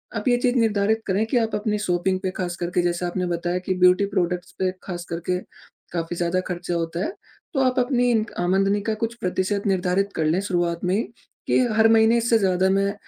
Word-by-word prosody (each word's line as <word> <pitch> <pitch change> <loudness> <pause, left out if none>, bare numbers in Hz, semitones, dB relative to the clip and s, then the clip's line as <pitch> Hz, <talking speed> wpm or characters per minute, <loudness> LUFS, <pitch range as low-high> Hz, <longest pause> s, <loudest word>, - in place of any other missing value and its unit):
आप 210 +1 -3
ये 245 -1 +4
चीज़ 245 0 +1
निर्धारित 220 -2 +2
करें 200 +3 +1
कि 245 +3 0
आप 225 -2 0
अपनी 210 0 -1
शॉपिंग 185 -1 0
पे 185 - -1
खास 175 -1 -3
करके 175 0 -1
जैसे 175 0 -1
आपने 180 +1 -2
बताया 175 +1 -1
कि 185 - +1
ब्यूटी 180 +2 +5
प्रोडक्टस 180 -1 -1
पे 185 -1 +1
खास 175 -2 -6
करके 175 +2 -2 0.5
काफ़ी 170 0 -3
ज़्यादा 175 +1 0
खर्चे 175 -1 -4
होता 170 0 -2
है। 350 - -3 0.4
तो 275 - 0
आप 255 0 +2
अपनी 245 -1 +2
इन 220 -2 +2
आमदनी 195 +3 +2
का - - +1
कुछ 230 +1 -1
प्रतिशत 190 +2 -1
निर्धारित 190 +1 +1
कर 160 - 0
लें 160 +4 +2
शुरुआत 175 -4 -1
में 180 - +1
ही, 220 - +1 0.4
कि - - +3
हर 220 +1 +4
महीने 225 +1 +5
इससे 230 0 +3
ज़्यादा 190 -2 +2
मैं 195 +1 +1
190 Hz, 210 wpm, -23 LUFS, 175-220 Hz, 0.5 s, ब्यूटी